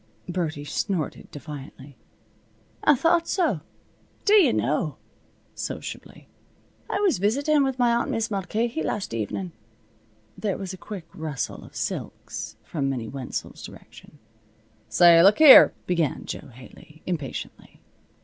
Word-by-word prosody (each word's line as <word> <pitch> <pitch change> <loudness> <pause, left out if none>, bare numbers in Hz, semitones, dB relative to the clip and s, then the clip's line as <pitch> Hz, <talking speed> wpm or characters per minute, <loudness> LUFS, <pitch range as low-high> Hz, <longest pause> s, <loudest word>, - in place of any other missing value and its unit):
Birdie 165 -5 -3
snorted 175 0 -3
defiantly. 145 -2 -10 0.9
"I 295 - +6
thought 335 +5 +2
so. 315 - 0 0.6
D'ye 415 -1 +6
know," - - -1 0.6
sociably, - - -7 0.6
"I - - -1
was 390 - +2
visitin' 280 +9 +2
with 265 -1 -1
my 240 -2 +3
aunt 235 - 0
Mis' 225 0 -1
Mulcahy 205 0 -2
last 190 - -3
evenin'." 115 - -3 0.8
There 205 -3 -2
was 190 -1 -6
a - - -6
quick 180 0 -8
rustle 155 -6 -5
of - - -15
silks - - -5
from 140 -4 -2
Minnie 120 -5 -4
Wenzel's 135 -2 -6
direction. - - -13 0.7
"Say, 170 -1 +7
look 200 +4 +6
here 305 -4 +10
" - - -37
began 170 -5 -1
Jo - - -6
Haley, 130 +5 -16
impatiently. 155 -7 -6
180 Hz, 125 wpm, -25 LUFS, 150-235 Hz, 0.9 s, here